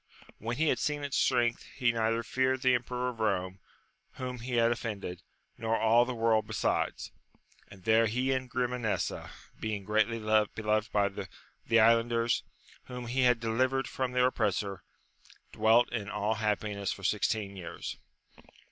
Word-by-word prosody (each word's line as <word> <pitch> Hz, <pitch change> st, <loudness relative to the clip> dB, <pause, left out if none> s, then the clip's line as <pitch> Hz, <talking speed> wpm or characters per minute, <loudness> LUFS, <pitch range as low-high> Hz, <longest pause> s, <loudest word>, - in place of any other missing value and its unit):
When 115 Hz, +3 st, -3 dB
he 160 Hz, 0 st, +2 dB
had 125 Hz, -, +1 dB
seen 145 Hz, +3 st, -1 dB
its 140 Hz, -1 st, -3 dB
strength, 120 Hz, -2 st, +2 dB
he 120 Hz, -3 st, +2 dB
neither 115 Hz, 0 st, 0 dB
feared 130 Hz, +2 st, 0 dB
the 130 Hz, -1 st, +5 dB
emperor 125 Hz, +1 st, -1 dB
of 120 Hz, -2 st, -9 dB
Rome, 95 Hz, -3 st, -1 dB, 0.5 s
whom 125 Hz, -1 st, -5 dB
he 125 Hz, +2 st, -6 dB
had 115 Hz, -1 st, +4 dB
offended, 105 Hz, -7 st, -4 dB, 0.4 s
nor 115 Hz, 0 st, 0 dB
all 115 Hz, +2 st, +4 dB
the 125 Hz, 0 st, -4 dB
world 110 Hz, -2 st, +2 dB
besides; 110 Hz, -1 st, -1 dB, 0.6 s
and 95 Hz, -2 st, -15 dB
there 115 Hz, +1 st, +4 dB
he 125 Hz, +4 st, 0 dB
and 130 Hz, -1 st, -1 dB
Grimanesa, 125 Hz, -3 st, -2 dB, 0.3 s
being 105 Hz, -2 st, -3 dB
greatly 110 Hz, +3 st, +1 dB
beloved 110 Hz, 0 st, +1 dB
by 100 Hz, -1 st, +2 dB
the 100 Hz, +3 st, -3 dB
islanders, 115 Hz, +1 st, +3 dB, 0.4 s
whom 125 Hz, -1 st, -7 dB
he 125 Hz, +3 st, 0 dB
had 125 Hz, -2 st, +4 dB
deli 115 Hz, +3 st, +1 dB
vered 135 Hz, 0 st, -2 dB
from 130 Hz, 0 st, -3 dB
their 125 Hz, 0 st, +3 dB
oppressor, 100 Hz, -5 st, -1 dB, 0.7 s
dwelt 110 Hz, +3 st, +4 dB
in 105 Hz, -4 st, -3 dB
all 105 Hz, +2 st, 0 dB
happiness 105 Hz, -2 st, -1 dB
for 95 Hz, -, -7 dB
sixteen 105 Hz, 0 st, 0 dB
years. 90 Hz, -3 st, -6 dB
115 Hz, 155 wpm, -30 LUFS, 105-125 Hz, 0.7 s, the